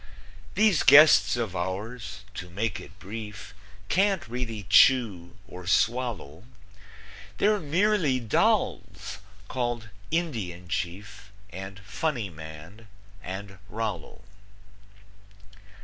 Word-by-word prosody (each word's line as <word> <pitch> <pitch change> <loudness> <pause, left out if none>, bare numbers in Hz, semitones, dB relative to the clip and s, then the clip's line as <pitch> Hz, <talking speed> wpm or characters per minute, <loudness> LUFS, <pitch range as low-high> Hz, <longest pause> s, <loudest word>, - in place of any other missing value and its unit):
These 205 -5 +4
guests 150 -4 +7
of 110 -6 -3
ours, 100 +3 -4
to 90 -2 -7
make 100 +2 -2
it - - -13
brief, 105 -1 -8 0.3
Can't 195 - +1
really 115 -3 -4
chew 100 -6 +4
or 90 0 -10
swallow; 110 - 0 0.9
They're 210 0 +3
merely 170 -3 +2
dolls, 115 -3 0 0.3
called 120 -3 -3 0.2
Indian 110 - -3
Chief, 100 +4 -5 0.2
And 95 +1 -8
Funny 110 - -3
Man, 80 +7 -11 0.3
and 95 +1 -7
Rollo. 105 -6 -5
105 Hz, 90 wpm, -27 LUFS, 95-125 Hz, 0.9 s, guests